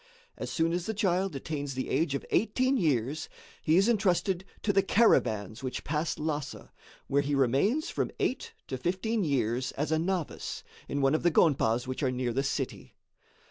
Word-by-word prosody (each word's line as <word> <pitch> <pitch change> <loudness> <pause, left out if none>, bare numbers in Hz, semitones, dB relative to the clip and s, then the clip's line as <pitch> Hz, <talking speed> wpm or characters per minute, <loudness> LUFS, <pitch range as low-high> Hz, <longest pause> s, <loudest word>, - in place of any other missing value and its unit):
As - - -5
soon 165 0 +1
as 175 0 -2
the 220 - -2
child 190 -4 +1
attains 140 -1 -4
the 130 - -3
age 145 +1 +1
of - - -4
eighteen 255 +5 +2
years, 150 - 0 0.3
he 160 +2 +3
is 195 +3 +4
entrusted 190 -4 +1 0.2
to 205 - +2
the 195 - +5
caravans 110 - +2
which 130 -1 -4
pass 155 +2 -1
Lhassa, 150 -2 -4 0.3
where 140 +1 +2
he 145 0 -1
remains 140 - +2
from - - -1
eight 255 - -1
to 130 - -4
fifteen 190 - 0
years 130 -4 0
as 150 +3 -2
a 160 - +2
novice, 175 -1 -3 0.2
in 140 - -2
one 135 +1 +3
of 155 - +1
the 175 - +4
gonpas 125 -8 +3
which 130 +2 -4
are 135 - +2
near 125 -1 -1
the 135 - +1
city. 135 - -4
155 Hz, 180 wpm, -29 LUFS, 135-190 Hz, 0.3 s, the